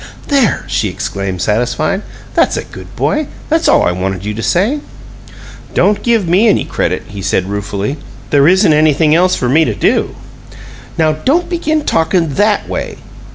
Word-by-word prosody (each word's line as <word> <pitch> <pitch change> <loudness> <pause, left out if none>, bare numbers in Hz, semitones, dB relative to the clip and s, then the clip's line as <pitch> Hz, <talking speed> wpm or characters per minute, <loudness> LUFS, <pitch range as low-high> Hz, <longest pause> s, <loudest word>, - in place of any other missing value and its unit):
"There!" 275 -6 +2
she - - 0
exclaimed, 95 -2 -4
satisfied. 125 - 0 0.3
"That's - - +2
a - - -3
good - - -12
boy! 305 -1 0 0.2
That's 320 +1 +1
all - - +4
I - - +2
wanted 95 +1 -3
you 105 - -2
to 110 - -5
say." 210 - +1 1.0
"Don't 205 0 +2
give 230 -6 +1
me 190 +7 +3
any 210 - +2
credit," - - -2
he 100 -1 -7
said, 95 0 0
ruefully. 100 +6 -3 0.3
"There 145 0 +4
isn't 185 -1 +4
anything 155 0 +3
else 180 +3 +3
for 125 - -2
me 150 +6 +4
to 110 -8 -1
do." - - 0 0.8
"Now, 155 -1 +3
don't 275 - 0
begin 315 -3 -1
talkin' 165 -2 +1
THAT 205 +7 +1
way!" - - -4
160 Hz, 165 wpm, -14 LUFS, -, 1.0 s, all